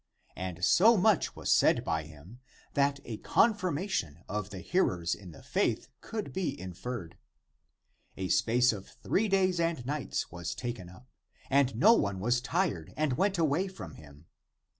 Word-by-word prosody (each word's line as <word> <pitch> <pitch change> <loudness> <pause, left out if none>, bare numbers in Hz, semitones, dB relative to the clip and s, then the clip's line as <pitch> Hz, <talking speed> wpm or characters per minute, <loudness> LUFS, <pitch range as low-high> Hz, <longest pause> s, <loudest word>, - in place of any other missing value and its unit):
And 90 0 -3
so 220 - +6
much 205 +2 +2
was - - +1
said - - +4
by 80 -1 -1
him, 80 +10 -14 0.3
that 140 0 +2
a 115 -2 -5
confirmation 185 - 0
of 105 -1 -3
the 100 - -8
hearers 90 - +1
in 95 -3 -9
the 80 - -13
faith - - 0
could 220 -2 -5
be 170 -7 -2
inferred. 95 -1 -6 1.0
A 95 -1 -3
space 115 +6 +3
of 100 -3 -8
three 220 +3 -1
days 185 -3 +2
and 165 -7 0
nights 145 +1 -3
was 85 0 -5
taken 120 -8 -5
up, 95 +8 -16 0.4
and 135 -3 +3
no 205 - +6
one 100 - 0
was 120 +5 +1
tired 135 - -1
and 150 -3 +1
went 195 +8 +1
away 165 +3 +1
from 190 0 -9
him. 75 0 -15
125 Hz, 160 wpm, -30 LUFS, -, 1.0 s, so